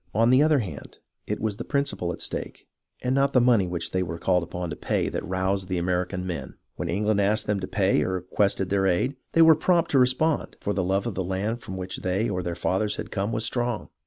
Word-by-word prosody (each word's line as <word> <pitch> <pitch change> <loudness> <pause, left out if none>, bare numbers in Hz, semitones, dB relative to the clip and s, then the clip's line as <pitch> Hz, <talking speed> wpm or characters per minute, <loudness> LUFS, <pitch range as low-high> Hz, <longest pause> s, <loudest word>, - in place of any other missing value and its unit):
On 115 +3 +4
the 130 +2 +6
other 155 0 +4
hand, 95 - -6 0.3
it - - -2
was 105 -2 -2
the - - -4
principle 140 - -1
at - - -6
stake, - - -4 0.4
and 125 - +1
not 140 0 +2
the 125 - +6
money 120 -6 +4
which 85 -1 -3
they 95 - 0
were 85 -2 -3
called 90 +1 +2
upon 85 0 -5
to - - -4
pay, - - -1
that - - -4
roused 95 +1 -1
the 90 -1 -1
American 90 +1 -1
men. 90 -2 -5 0.2
When - - -4
England 105 +2 +1
asked 105 +2 +2
them 105 -1 0
to - - -4
pay - - +2
or 95 - -1
requested 95 +1 0
their 95 -1 +2
aid, 110 +10 +1 0.2
they 165 - +6
were 160 0 +8
prompt 170 +2 +2
to 135 - +4
respond, 130 +5 +1
for 105 - -2
the 95 - 0
love 95 +3 0
of 120 - -2
the 95 - -2
land 100 +6 -2
from 95 - -7
which 95 0 -5
they 95 +5 0
or 90 -2 -2
their 85 -1 -3
fathers 105 +4 0
had - - -6
come 100 +3 -1
was 110 0 -1
strong. 120 -3 -2
100 Hz, 245 wpm, -25 LUFS, 90-120 Hz, 0.4 s, were